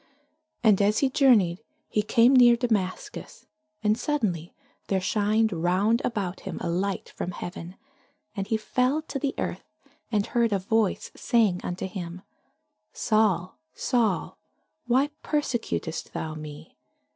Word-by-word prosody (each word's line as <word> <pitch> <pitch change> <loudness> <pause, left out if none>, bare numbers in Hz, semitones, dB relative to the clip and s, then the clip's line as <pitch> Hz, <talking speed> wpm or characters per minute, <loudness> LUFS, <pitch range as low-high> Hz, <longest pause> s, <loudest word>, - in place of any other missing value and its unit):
And 210 -4 +5
as 205 +1 +3
he 270 -2 +2
journeyed, 215 - +4 0.3
he 210 - +1
came 230 +5 +4
near 240 -2 +8
Damascus: 215 -6 -3 0.4
and 210 0 +3
suddenly 210 - -1 0.4
there 195 - +1
shined 215 +2 +1
round 185 +7 +2
about 195 -6 -2
him 190 -4 -6
a 170 - -3
light 190 +3 -2
from - - -5
heaven: 175 0 -7 0.6
and 195 -1 -3
he 220 - +1
fell 255 +7 0
to 280 - -5
the 275 0 -2
earth, 180 - -4 0.4
and 205 -2 +1
heard 235 -3 +1
a - - +3
voice 205 +1 0
saying 215 -7 +2
unto 180 +2 -3
him, 180 -1 -7 0.7
Saul, 210 -5 +1 0.2
Saul, 230 -7 0 0.5
why 265 +4 +3
persecutest 240 - -2
thou 160 -1 -4
me? 150 -1 -9
210 Hz, 135 wpm, -26 LUFS, 185-235 Hz, 0.7 s, near